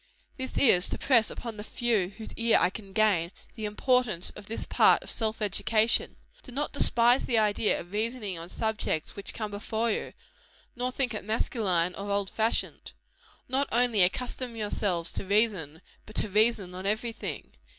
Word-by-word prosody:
This 260 0 -6
is, 190 -9 +6
to - - -3
press 235 -5 +4
upon 230 -3 -7
the 210 - -6
few 225 -5 0
whose 220 - -9
ear 230 -1 +3
I 180 - +2
can 195 0 -9
gain, 190 -5 +2 0.2
the 220 -3 -6
importance 215 -3 +1
of 205 -1 -12
this 225 - -4
part - - +4
of - - -3
self 220 -1 +1
education. 215 +2 +2 0.3
Do 255 - -12
not 285 +4 -2
despise 245 -2 +3
the 235 - +2
idea 210 0 +2
of 175 - -10
reasoning 215 -2 -2
on 165 +1 -7
subjects 220 -8 -2
which 200 - -3
come 215 -2 -4
before 220 +3 -2
you; - - -3 0.6
nor 250 +1 -2
think 255 -2 -1
it 215 - -4
masculine 195 -5 0
or 200 +2 -6
old 200 -1 -1
fashioned. 220 +1 -1 0.5
Not 265 +2 0
only 235 -3 +3
accustom 245 +6 0
yourselves 200 -5 -1
to - - -4
reason, 195 -7 0 0.2
but 215 - -13
to 215 - -1
reason 210 -2 +2
on 185 +2 -5
every 220 +3 -1
thing. - - -7
215 Hz, 175 wpm, -28 LUFS, 195-235 Hz, 0.6 s, is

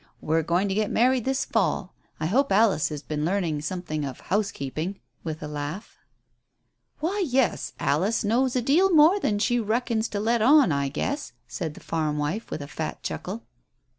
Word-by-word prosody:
"We're 160 +1 +1
going 175 +5 +1
to 195 - -1
get 210 +1 0
married 250 0 +2
this 265 0 0
fall. 185 -4 0 0.3
I 155 - -2
hope 265 - +2
Alice 200 -5 +3
has 150 -2 -6
been 150 -1 -3
learning 170 -4 0
something 155 -1 -3
of 135 -3 -5
housekeeping" 190 -3 -2 0.2
with 155 -2 -5
a - - -4
laugh. 150 +7 -6 1.0
"Why, 385 +6 0
yes. 260 -1 +1
Alice 180 +13 +1
knows 245 +5 +1
a 250 - +1
deal 335 +10 +4
more 325 +5 +6
than 210 - 0
she 240 +3 +1
reckons 225 0 0
to 205 - -3
let 230 +2 +1
on, 275 - +6
I 140 -1 0
guess," 280 - -3
said 160 -6 -4
the - - -12
farm 155 -2 -1
wife, 150 +10 -2
with 145 - -4
a - - -8
fat 155 +1 -5
chuckle. 210 +6 -5
200 Hz, 180 wpm, -25 LUFS, 155-240 Hz, 1.0 s, more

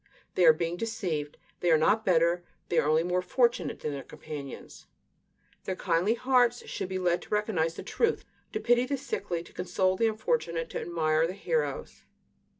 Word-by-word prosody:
They 180 - +3
are - - +11
being 170 +2 -2
deceived. 175 -9 -3 0.2
They 175 - +1
are 160 - +6
not 210 +8 +3
better, 175 -1 +3 0.3
they 170 - +3
are 150 - +1
only 155 +1 +3
more 180 +1 0
fortunate 235 - +1
than 150 - -2
their 140 -1 -4
companions; 145 -2 -9 0.8
their 190 - -2
kindly 180 +5 +1
hearts 245 -1 +2
should 185 - -4
be 190 - -2
led 180 -1 +1
to - - -13
recognize 195 -6 0
the - - -7
truth; 460 -1 0 0.3
to 430 - -2
pity 245 - +3
the, 280 +1 -1
sickly, 255 - -3
to - - -17
console 185 +1 0
the 225 +4 +2
unfortunate, 215 -7 -1
to - - -3
admire 160 -1 +1
the 180 - -4
heroes. 475 - -2
180 Hz, 180 wpm, -29 LUFS, 165-225 Hz, 0.8 s, are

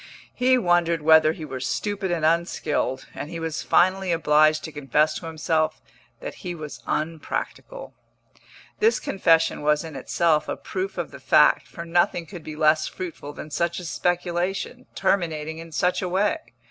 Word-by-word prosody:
He 255 +1 +3
wondered 175 -6 +2
whether 160 0 +6
he 160 -1 -7
were 130 -3 -6
stupid 200 +9 -2
and 170 -3 0
unskilled, 160 -5 0
and 145 - -6
he 165 0 -6
was 165 -1 -3
finally 185 +1 +2
obliged 155 -1 +3
to 160 - -6
confess 150 +2 +1
to 165 - -8
himself 160 0 0 0.4
that - - -5
he 180 -3 -5
was 155 -3 -8
unpractical. 165 - -4 0.9
This 445 +1 +3
confession 165 -5 +2
was 150 +1 +2
in 160 -3 -8
itself 155 +3 +1
a - - -2
proof 380 +1 -4
of - - -3
the - - -10
fact, - - +4
for 170 - -8
nothing 170 0 +1
could 175 -1 -10
be 155 - -7
less 155 0 +3
fruitful 165 -5 -7
than 150 - -9
such 170 +2 -1
a 180 - -8
speculation, 180 +8 -2
terminating 160 -5 -1
in 165 0 -10
such 180 +5 +1
a 180 - -2
way. 195 +3 +1
165 Hz, 165 wpm, -24 LUFS, 155-180 Hz, 0.9 s, whether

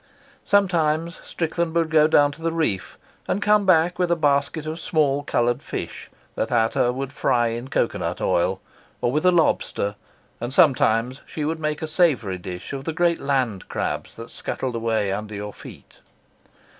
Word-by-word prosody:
Sometimes 170 -4 +1
Strickland 165 0 -2
would 165 -1 +1
go 155 -1 +5
down 145 -2 +4
to 145 +3 -13
the 165 0 0
reef, 160 - -1 0.3
and 195 - 0
come 210 -1 +3
back 175 0 +4
with 180 -1 +2
a 170 - +3
basket 145 0 +1
of 160 +2 -4
small, 145 -4 +1
coloured 120 -4 0
fish - - -6 0.2
that - - -2
Ata 115 +1 +2
would 135 +2 -5
fry 120 -5 +2
in 120 +2 -5
cocoa - - 0
nut - - -3
oil, 95 +2 +1 0.4
or 120 - 0
with 155 +6 +1
a - - +7
lobster; 160 - +1 0.5
and 120 +2 -4
sometimes 130 -5 +3
she 150 - -4
would 160 +1 -2
make 150 0 -2
a - - -2
savoury 145 - +1
dish 90 +7 -7
of 135 0 -5
the 160 - -2
great 170 0 +2
land 130 -8 -1
crabs - - -3
that 115 0 -9
scuttled 130 -2 -4
away 115 -3 0
under 105 +1 -4
your 105 0 -6
feet. - - -13
145 Hz, 175 wpm, -23 LUFS, 120-165 Hz, 0.5 s, a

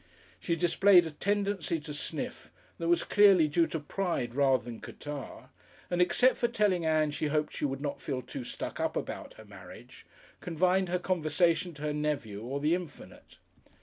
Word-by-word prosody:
She 170 - -1
displayed 175 +2 +5
a 160 - -5
tendency 200 -2 -1
to 150 0 -7
sniff 145 - -5 0.3
that 165 - -2
was 170 0 +3
clearly 195 -6 +5
due 165 +2 +2
to 160 - -3
pride 150 -6 -2
rather 135 -2 +3
than 120 -2 -8
catarrh, 145 -2 -8 0.4
and 175 0 +1
except 245 +8 +4
for 240 - +2
telling 210 -7 +1
Ann 155 -1 +2
she 150 - -2
hoped 150 0 -1
she - - -2
would 135 -1 -3
not 145 -1 -4
feel 130 -3 -3
too 130 +1 -7
"stuck - - -6
up" - - -1
about - - -6
her - - -13
marriage, - - -13 0.3
confined 180 +2 +1
her 180 - +1
conversation 170 -1 +1
to 150 - -9
her 150 -1 -1
nephew 145 -9 -2
or 130 +5 -4
the 150 +3 +2
infinite. 175 -3 -7
160 Hz, 180 wpm, -30 LUFS, 145-180 Hz, 0.4 s, displayed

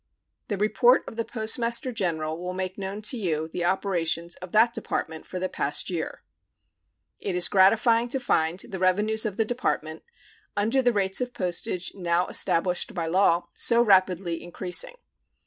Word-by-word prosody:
The 205 - -2
report 215 +5 +3
of - - -8
the 230 - -1
Postmaster 235 +3 -1
General 165 -8 -2
will 180 +2 -5
make 185 0 -3
known 200 +2 -6
to 245 +4 -1
you 160 -7 -1
the 175 +2 -4
operations 175 -2 0
of 185 -1 -10
that 230 +2 +4
Department 160 -7 -4
for 185 - -6
the 185 +1 -1
past 145 +1 -1
year. 165 -3 -4 1.0
It 190 - -3
is 180 -1 +4
gratifying 225 +5 +4
to 265 +2 +1
find 165 -8 +1
the 190 0 -4
revenues 210 +4 +2
of 200 - -6
the 225 - +2
Department, 215 -10 -2 0.6
under 225 +6 +2
the 245 -1 +3
rates 195 0 0
of 245 0 -4
postage 180 0 -2
now 175 -1 0
established 180 +6 +1
by 170 -2 -2
law, 175 0 +2
so 235 0 +3
rapidly 185 -4 +2
increasing. 180 - -1
190 Hz, 165 wpm, -26 LUFS, 175-225 Hz, 1.0 s, that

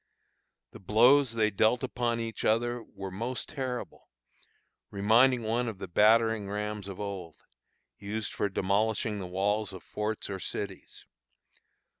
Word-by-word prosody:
The - - -12
blows 120 +6 +5
they 110 -2 +2
dealt 110 +5 +2
upon 120 -2 -1
each 115 -2 -4
other 120 +2 +1
were 95 -3 -8
most 115 +6 -4
terrible, 130 -4 -5 0.8
reminding 115 +5 +4
one 115 +3 0
of 110 -4 -4
the 95 - -6
battering 110 +2 +3
rams 105 0 -4
of 100 0 -8
old, 95 -6 -5 0.6
used 105 +2 -4
for 100 - -1
demolishing 105 +3 0
the 95 - -5
walls 100 +2 0
of 95 - -9
forts 105 +1 -3
or 95 -1 -5
cities. 95 0 -6
110 Hz, 135 wpm, -29 LUFS, 100-115 Hz, 0.8 s, blows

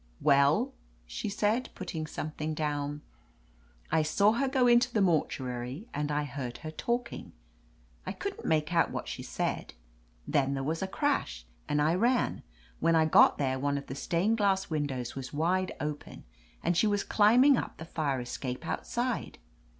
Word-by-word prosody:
Well 140 0 +3 0.2
?" - - -33
she - - -4
said, 215 +4 0
putting 160 -4 -5
something 155 0 -4
down. 145 -1 -2 0.9
1 160 - +3
saw 200 +7 +4
her 270 +5 0
go 260 -1 +2
into 240 +1 +5
the 220 - +1
mortuary, 135 - -1
and 150 +1 -2
I 150 0 0
heard 130 -3 -5
her 155 - -4
talking; 235 +8 -3 0.7
I - - -4
couldn't - - -5
make 155 +1 +1
out 165 - +3
what - - -5
she - - -5
said. - - -3 0.5
Then 140 -1 +1
there 135 - -2
was 160 +4 -2
a 190 - -1
crash, 190 - -1 0.2
and 145 - +1
I 155 +2 +3
ran. 240 +7 +1 0.4
When 165 0 +3
I 160 -1 +4
got 155 - +6
there 130 -2 0
one 140 +1 0
of 140 - -6
the - - -6
stained 180 +10 0
glass 195 -3 +1
win 150 -2 0
dows 125 -3 -4
was 135 0 -6
wide 180 +5 +1
open, 150 0 -5 0.4
and 175 - +1
she 215 - +3
was 205 -1 +1
climbing 245 +7 +5
up - - -4
the 160 - -8
fire 150 -5 -1
escape 125 +1 -5
outside. 240 0 -2
155 Hz, 175 wpm, -30 LUFS, 140-205 Hz, 0.9 s, got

